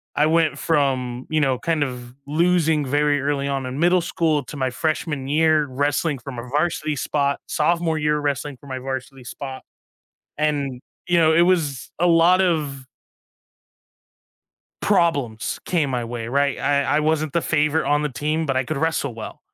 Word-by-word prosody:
I 150 - +3
went 160 0 +2
from, 130 -5 0
you 155 -1 +1
know, 135 -4 +2
kind 160 +2 0
of 125 -2 -6
losing 160 -1 +2
very 145 +1 +1
early 140 -1 -1
on 135 -1 -2
in 130 +2 -5
middle 175 +2 +4
school 165 -3 0
to 150 - -8
my 130 -1 0
freshman 150 0 -2
year 155 0 +3
wrestling 145 +2 -1
from 130 -1 -8
a 120 - -6
varsity 155 0 -1
spot, 140 0 0
sophomore 165 +1 +1
year 150 0 +1
wrestling 145 -1 -2
for 140 - -15
my 130 -1 -4
varsity 130 0 -6
spot, 130 +2 -7 0.8
and, 145 -4 -1 0.3
you 175 -1 +3
know, 160 -1 +5
it 170 +2 +5
was 165 -7 0
a 175 - +3
lot 170 +2 +5
of 150 -7 -1 2.0
problems 145 - +1
came 155 -6 0
my 125 -2 -1
way, 115 -1 -5
right? 140 +2 +1
I 140 -1 +1 0.2
I - - +3
wasn't 155 -1 0
the 170 - +2
favorite 155 0 +1
on 145 +1 +2
the 150 - -1
team, 155 +4 -2
but 135 -1 0
I 130 - +1
could 155 +2 -3
wrestle 155 -5 -1
well. 110 -1 -8
145 Hz, 170 wpm, -22 LUFS, 135-160 Hz, 2.0 s, know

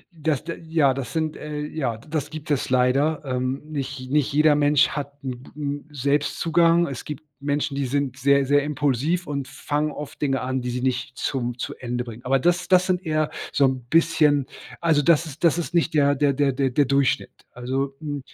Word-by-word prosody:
das 155 -3 -1
de 165 0 -5
ja, 160 -5 +2
das 130 -3 -5
sind, 155 -1 -1
äh 150 -1 -5
ja, 135 -7 -3
das 150 +3 -4
gibt 155 -1 -7
es 135 - 0
leider. 135 +5 +2
Ähm, 130 +2 -2
nicht 135 -3 -5
nicht 150 -3 +2
jeder 150 +1 +5
Mensch 145 0 +4
hat 145 -1 -4
'n 125 -2 -5
g - - -14
'n 145 0 -3
Selbstzugang. 165 +4 +2
Es 135 -5 -6
gibt 150 +1 -7 0.2
Menschen, 145 +1 -1
die 140 -2 -1
sind 140 -1 -1
sehr, 140 0 +3
sehr 145 +1 +4
impulsiv 145 +4 0
und 140 -2 -4
fangen 150 +1 -2
oft 150 +1 -8
Dinge 135 -2 +1
an, 130 0 -2
die 125 - -3
sie 125 +1 -3
nicht 130 0 -2
zum 120 -2 -2
zu - - -4
Ende 125 0 -3
bringen. 120 0 -10
Aber 135 +1 +3
das 175 +5 +1
das 185 -1 +5
sind 185 0 0
eher 155 -2 0 0.2
so 140 - +3
'n 130 -2 0
bisschen 155 -4 +3 0.4
also, 160 -3 +3
das 165 +2 +4
ist 155 +2 -10
das 170 0 +4
ist 170 0 -3
nicht 165 -2 +1
der 145 -1 +4
der 140 0 +2
der 140 0 +2
der 135 0 +1
der 140 +3 +2
Durchschnitt. 140 0 +1 0.2
Also, 135 +2 -2
mm 145 -2 -4
145 Hz, 205 wpm, -24 LUFS, 130-155 Hz, 0.4 s, jeder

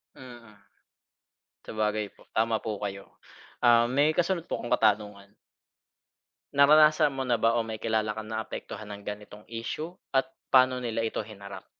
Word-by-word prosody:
Mhm. 120 -4 -13 1.1
Sabagay 105 -1 -2
po, - - -22
tama 110 0 +2
po 105 -3 -4
kayo. 100 -1 -7 0.5
Ah, 120 0 +6
may 145 +4 +3
kasunod 175 -1 0
po - - -3
akong 120 - -6
katanungan. 105 -1 0 1.2
Naranasan 150 +1 +6
mo 135 -1 -4
na 120 -3 0
ba 115 +1 +3
o 115 - 0
may 110 -1 -6
kilala 110 -1 0
kang 110 0 -7
naapektuhan 110 -1 -6
ng 100 - -9
ganitong 105 0 -8
isyu 150 +9 -5 0.2
at 135 +4 +2 0.2
paano 130 0 +6
nila 115 -2 -2
ito 115 - -3
hinarap? 100 -3 -10
115 Hz, 150 wpm, -28 LUFS, 105-130 Hz, 1.2 s, Ah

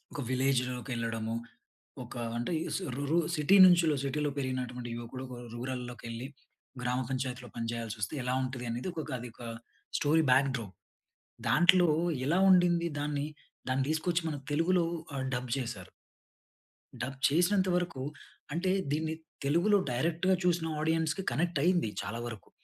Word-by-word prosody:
ఒక 145 - -2
విలేజ్‌లోకెళ్ళడము. 125 -3 0 0.7
ఒక - - -10 0.2
అంటే 120 +8 -2 0.2
సు - - -1
రు 140 - -2
రు 165 - +3 0.2
సిటీ 150 +6 +5
నుంచిలో 175 -4 +6
సిటీలో 145 +2 0
పెరిగినటువంటి 125 -3 -3
యువకుడు 120 +2 -6
ఒక 125 -1 -8 0.2
రూరల్‌లోకెళ్లి 125 -1 -5 0.6
గ్రామ 125 +1 0
పంచాయతీలో 130 -1 -3
పని 115 -1 -2
చేయల్సొస్తే, 115 -2 -4
ఎలా 125 +1 0
ఉంటది 130 -1 -4
అనేది 120 +9 -3
ఒక 165 - -4
ఒక - - -8
అది 120 0 -7
ఒక - - -13 0.6
స్టోరీ 155 +2 +3
బాక్ 135 +2 +5
డ్రాప్. 105 -5 -7 0.7
దాంట్లో 180 0 +6 0.4
ఎలా 170 +5 +3
ఉండింది 175 -2 +5
దాన్ని. 145 0 -1 0.4
దాన్ని 130 +1 +2
దీసుకొచ్చి 170 +2 +1
మనకు 145 -2 -6
తెలుగులో 170 +3 +3 0.3
ఆహ్, 130 -1 -2
డబ్ 125 +1 -4
జేసారు. 115 -8 -5 1.1
డబ్ 130 +2 -4
చేసినంత 185 +5 +3
వరకు 175 -6 -1 0.5
అంటే, 185 +3 +1 0.2
దీన్ని 160 +2 0 0.3
తెలుగులో 175 +9 +4
డైరెక్ట్‌‌గా 170 +9 +2
చూసిన 175 -2 +2
ఆడియన్స్‌కి 160 +3 0
కనెక్ట్ 170 -1 0
అయింది 175 -9 +3
చాలా 115 +4 -4
వరకు. 115 -3 -8
135 Hz, 140 wpm, -31 LUFS, 125-170 Hz, 1.1 s, నుంచిలో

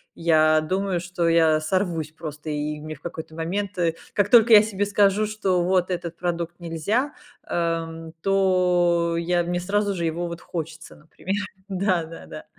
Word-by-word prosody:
я 155 -2 +4
думаю, 185 +2 -1
что 175 -1 -2
я 160 -2 +4
сорвусь 165 -2 -1
просто 155 -1 -8
и 150 0 -3
мне 155 +1 -7
в 145 - -20
какой-то 160 -2 -7
момент, 190 +4 -3
э, 165 -2 +1 0.2
как 205 0 +1
только 230 0 +7
я 210 - +10
себе 205 -2 -1
скажу, 205 +1 +3
что 195 -4 0
вот 185 0 +1
этот 170 -2 -4
продукт 175 0 -3
нельзя, 200 - -1 0.3
эм, 165 -1 -2
то 180 -3 +2
я 175 +1 +1
мне 175 +1 -2
сразу 200 +2 0
же 170 -1 -2
его 170 +2 -2
вот 170 0 -6
хочется, 165 -1 -7
например. 170 +5 -5 0.3
Да, 185 -3 0
да, 165 - -11
да. - - -10
175 Hz, 165 wpm, -24 LUFS, 165-190 Hz, 0.3 s, я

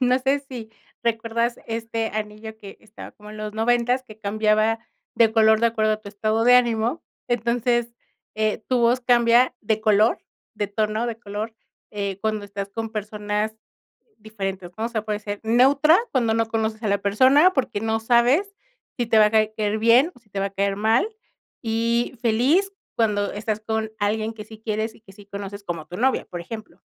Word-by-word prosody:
No 250 0 +3
sé, 270 +2 +1
si 235 -4 -8 0.3
recuerdas 230 +1 -1
este 225 0 -3
anillo 215 +1 -5
que 200 -2 -11
estaba 215 0 -11
como 210 0 -13
en 215 - -10
los 215 0 -5
noventas, 240 +3 +1
que 215 -3 -14
cambiaba 215 +1 +1 0.4
de 230 -1 +4
color 220 -1 +5
de 235 - +4
acuerdo 220 -2 +1
a 215 - -3
tu 205 - -10
estado 215 +2 0
de 245 +1 +7
ánimo. 240 +4 +1 0.3
Entonces 240 0 0 0.4
eh, 215 -1 0
tu 255 -1 +2
voz 240 +2 +3
cambia 240 0 +4
de 220 0 0
color, 215 +1 +3 0.4
de 210 -1 -2
tono, 215 +2 -1
de 230 -1 -4
color, 215 +1 -5 0.4
eh, 200 -2 -3
cuando 215 -1 -1
estás 200 0 -6
con 225 +2 -4
personas 210 0 -3 0.7
diferentes, 195 -4 -5
¿no? 225 - -2
O - - -4
sea, 225 -3 -2
puede 210 -1 -2
ser 205 -1 -6
neutra 275 +8 +5
cuando 235 -4 +2
no 225 0 +1
conoces 220 0 -2
a 215 - -1
la 200 - +3
persona, 260 - +5
porque, 255 - -1
no 225 0 0
sabes 250 - +3 0.4
si 240 - +1
te 225 -1 +4
va 215 - +7
a 210 - 0
caer 215 -1 +1
bien 240 +9 +4
o - - -18
si 210 -3 -33
te 200 - -5
va 195 - +1
a - - -5
caer 195 0 -1
mal, 220 - +2 0.6
y 230 +2 0
feliz 265 - +2 0.2
cuando 210 -3 +1
estás 210 +1 -3
con 220 0 -2
alguien 215 +2 -1
que 215 - -8
sí 220 0 -13
quieres 220 0 -2
y - - -19
que 195 - -16
sí 200 +1 -16
conoces 200 0 -7
como 165 -3 -5
tu 180 - -8
novia, 260 +3 +2
por 175 -1 -6
ejemplo. 215 +5 -9
220 Hz, 190 wpm, -23 LUFS, 210-235 Hz, 0.7 s, de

